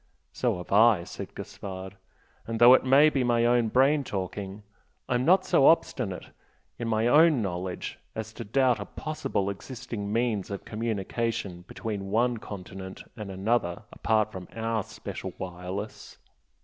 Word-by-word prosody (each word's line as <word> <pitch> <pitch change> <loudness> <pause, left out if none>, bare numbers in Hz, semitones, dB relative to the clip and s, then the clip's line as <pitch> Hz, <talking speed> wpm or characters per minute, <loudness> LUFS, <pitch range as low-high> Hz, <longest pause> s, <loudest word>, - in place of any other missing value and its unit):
"So - - 0
have 90 - -9
I" 105 -3 +6
said - - -8
Gaspard 95 -1 -7 0.5
"And 115 0 -2
though 120 +1 +9
it - - +5
may 140 +4 +6
be 135 -3 +1
my 120 -1 +2
own 120 -1 +3
brain 135 +5 +3
talking, 100 -1 -5 0.4
I'm 125 +1 +1
not 185 +2 +5
so 135 - +5
obstinate 120 - +1 0.5
in 120 - -2
my 110 0 +1
own 150 -1 +5
knowledge 90 -1 -4 0.2
as 110 0 -5
to 115 - -6
doubt 125 +1 +2
a 100 - -4
possible 155 -10 -3
existing 105 -1 -6
means 115 -3 0
of 100 -1 -6
communication 110 -4 -3
between 100 -4 -5
one 120 +3 +2
continent 95 -2 -8
and 105 -2 -7
another 95 -1 -1
apart 110 -1 +1
from 95 -3 -8
OUR 115 -1 -1
special - - -7
'wireless.' 95 +3 -6
110 Hz, 150 wpm, -27 LUFS, 95-120 Hz, 0.5 s, though